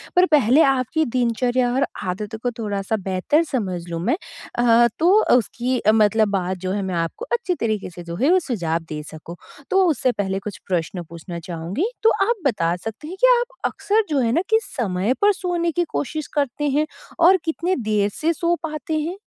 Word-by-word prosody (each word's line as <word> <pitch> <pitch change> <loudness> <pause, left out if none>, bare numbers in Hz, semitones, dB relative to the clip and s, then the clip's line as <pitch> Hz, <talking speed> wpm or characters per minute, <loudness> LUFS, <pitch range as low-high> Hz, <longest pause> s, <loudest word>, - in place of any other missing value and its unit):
पर 360 - +6
पहलेआपकी 270 +3 +3
दिनचर्या 245 +1 +1
और 270 +2 +2 0.2
आदतों 205 +4 -4
को 245 - 0
थोड़ा-सा 205 0 -2
बेहतर 190 - +2
समझ 195 - -3
लूँ 165 -1 -3
मैं 260 +9 +2 0.4
अ, 235 0 +5
तो 340 +3 +4 0.3
उसकी 245 +4 -1
अ, 215 - +4
मतलब 215 0 +3
बात 185 0 -2
जो 185 +1 -4
है। 200 0 -1
मैं 190 -2 -3
आपको 165 - -3
अच्छे 470 -7 0
तरीके 215 -7 -2
से 175 0 -10
जो 170 0 -6
है 275 - +2
वो 370 - +5
सुझाव 175 - -2
दे 150 -1 -4
सकूँ 160 +2 -9 0.3
तो 385 0 +4
उससे 265 -4 +1
पहले 195 -4 -2
कुछ 200 0 -7
प्रश्न 175 0 -2
पूछना 170 +1 -7
चाहूँगी 180 - -2
तो 450 - +7 0.2
आप 475 - +3
बता 175 -9 +1
सकते 225 +10 -7
हैं 370 +3 -7
कि - - +7
आप - - -5
अक्सर 435 +2 +1
जो 290 -3 +1
है 230 -2 +1
ना 335 - +2
किस 445 0 +3
समय 205 -1 -1
पर 415 0 +6
सोने 350 -3 -1
की 350 - 0
कोशिश 310 +1 -3
करते 290 0 -1
हैं? 295 +3 +2 0.3
और 365 +3 +7
कितने 335 +3 0
देर 210 -4 0
से 325 +2 0
सो 340 +2 +1
पाते 310 0 -3
हैं? 335 +5 -3
240 Hz, 195 wpm, -22 LUFS, 190-320 Hz, 0.4 s, तो